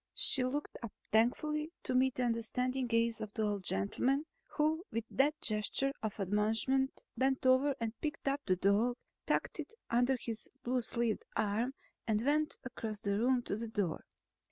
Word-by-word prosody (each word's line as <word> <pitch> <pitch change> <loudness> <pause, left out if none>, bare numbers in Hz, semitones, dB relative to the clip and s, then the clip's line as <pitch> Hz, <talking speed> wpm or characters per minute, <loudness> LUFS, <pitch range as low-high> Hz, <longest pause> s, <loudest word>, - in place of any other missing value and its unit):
She 260 - +3
looked 280 +4 -3
up 230 -3 -5 0.2
thankfully 300 +8 +2
to - - 0
meet 260 0 +3
the 255 - 0
understanding 250 +2 0
gaze 230 -1 +1
of 215 - -5
the 220 - 0
old 205 -2 -1
gentleman 255 - +1 0.2
who 315 +2 0
with 230 - -1
that 295 +4 +2
gesture 215 +6 +1
of 220 -1 -3
admonishment 220 +7 +1
bent 265 0 +1
over 260 +2 +4
and 225 -1 -2
picked 300 -2 -3
up 280 +1 +1
the 185 - +4
dog, 205 +6 +2 0.3
tucked - - 0
it 450 - -6 0.2
under 245 +3 +3
his 230 -2 -5
blue 250 +1 +1
sleeved 235 -1 0
arm 220 +6 0 0.3
and 220 +1 +1
went 300 +2 +2
across 220 -4 -5
the 200 -1 0
room 250 +1 +3
to - - -2
the 230 +2 -4
door. 205 -7 -2
240 Hz, 170 wpm, -34 LUFS, 215-265 Hz, 0.3 s, over